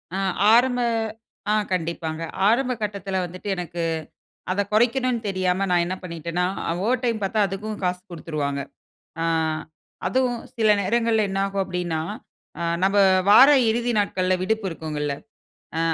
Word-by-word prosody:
ஆ, - - -1 0.4
ஆரம்ப, 245 +1 +4 0.7
ஆ - - +4 0.2
கண்டிப்பாங்க. 165 -2 -3 0.3
ஆரம்ப 250 +3 +2
கட்டத்தில 200 -2 -2
வந்துட்டு 185 +3 -7
எனக்கு, 175 -1 -4 0.7
அத 195 +2 +1
குறைக்கணுன்னு 245 +2 +2
தெரியாம 185 0 0
நான் 175 -1 +4
என்ன 185 +2 -3
பண்ணிட்டேனா, 170 0 -2 0.2
ஆ - - 0
ஓவர் 250 +2 +1
டைம் 230 -3 0
பாத்தா 205 +3 0
அதுக்கும் 210 +3 -5
காசு 180 0 -1
குடுத்துருவாங்க. 150 -4 -3 0.6
ஆ, - - 0 0.8
அதுவும் 245 +3 +1 0.2
சில 220 -2 +2
நேரங்கள்ல 225 +2 +2
என்ன 195 0 -1
ஆகும் 195 0 -1
அப்பிடின்னா, 180 -3 -2 0.6
ஆ - - -2 0.2
நம்ப 195 +1 +3 0.3
வார 260 +6 +9 0.2
இறுதி 240 +2 0
நாட்கள்ல 185 -2 +1
விடுப்பு 220 +1 0
இருக்குங்கல்ல, 150 -3 -3 0.7
ஆ - - +1
195 Hz, 135 wpm, -23 LUFS, 175-225 Hz, 0.8 s, வார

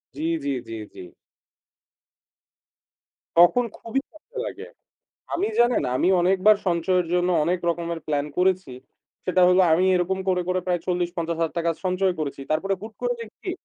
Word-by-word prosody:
জ্বী, 155 +3 -2 0.2
জ্বী, 140 0 -1
জ্বী, 115 - -6 0.2
জ্বী। - - -9 2.3
তখন 175 +9 +6
খুবই 245 +4 -2
খারাপ 325 +10 -21
লাগে। - - -7 0.7
আমি 380 +4 0
জানেন, 240 0 +4
আমি 175 - +2
অনেকবার 190 +4 +4
সঞ্চয়ের 180 0 +1
জন্য 180 0 +2 0.2
অনেক 180 +3 +1
রকমের 170 -1 -4
প্ল্যান 145 -1 0
করেছি। 185 -5 +1 0.5
সেটা 185 0 +2
হলো 180 +1 +5
আমি 175 +3 +3
এরকম 180 +1 0
করে, 180 -1 +2
করে 185 0 +1
প্রায় 175 -1 0
৪0,000-৫0,000 170 -2 -2
টাকা 170 0 +1
সঞ্চয় 185 +1 +1
করেছি। 140 -2 -4
তারপরে 195 +6 +1
হুট 220 +2 -8
করে 245 0 0
দেখি, 230 - -8
180 Hz, 145 wpm, -24 LUFS, 170-190 Hz, 2.3 s, তখন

